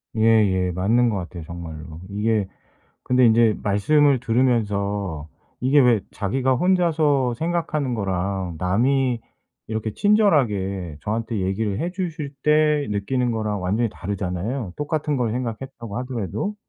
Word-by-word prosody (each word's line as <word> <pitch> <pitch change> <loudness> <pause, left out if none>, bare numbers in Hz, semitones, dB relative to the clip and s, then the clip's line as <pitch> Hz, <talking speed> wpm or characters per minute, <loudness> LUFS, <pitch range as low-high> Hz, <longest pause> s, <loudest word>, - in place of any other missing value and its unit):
예예. 105 -5 +3
맞는 115 +7 +2
것 105 - -1
같아요 85 -2 -6
정말로. 80 -1 -8
이게 105 0 0 0.6
근데 125 0 +3
인제 115 -1 +4
말씀을 135 +7 +3
들으면서 100 - 0 0.3
이게 135 +3 +4
왜 120 -4 +4
자기가 130 +6 0
혼자서 155 -8 +2
생각하는 155 -4 -1
거랑 95 -3 -2
남이 120 +6 +1 0.5
이렇게 110 -1 -3
친절하게 105 - +2
저한테 110 +2 -2
얘기를 95 +2 -1
해 175 - -1
주실 165 -6 -4
때 150 -1 +3
느끼는 120 +5 0
거랑 105 -3 -2
완전히 110 +6 +1
다르잖아요. 95 +4 -4
똑같은 150 -1 -1
걸 120 -3 0
생각했다고 120 -2 -5
하더라도. 125 - -3
115 Hz, 300 characters per minute, -23 LUFS, 100-135 Hz, 0.6 s, 인제